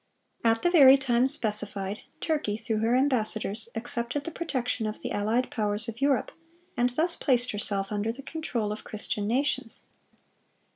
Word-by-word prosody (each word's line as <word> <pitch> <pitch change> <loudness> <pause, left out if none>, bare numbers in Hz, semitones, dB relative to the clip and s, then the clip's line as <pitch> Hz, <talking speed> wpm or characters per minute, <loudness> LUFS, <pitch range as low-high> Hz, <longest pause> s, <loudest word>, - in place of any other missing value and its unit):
(560) 230 - +3
At 225 0 +1
the 350 +1 +2
very 270 -1 +9
time 255 -2 +2
specified, 210 -4 +1 0.2
Turkey, 295 -10 -1
through 225 -1 -2
her 230 +3 +2
ambassadors, 225 -4 0
accepted 240 +4 -1
the 335 - -6
protection 255 -8 -2
of 215 - -6
the - - -3
allied 220 +5 0
powers 210 +1 -1
of 230 +2 -7
Europe, 275 -2 +1 0.4
and 245 +1 +2
thus 320 +7 0
placed 250 -3 +1
herself 200 -1 -2
under 210 +2 -1
the 265 +4 -10
control 245 -10 -3
of 210 - -6
Christian 210 -1 -3
nations. 260 0 0
235 Hz, 160 wpm, -27 LUFS, 215-265 Hz, 0.4 s, very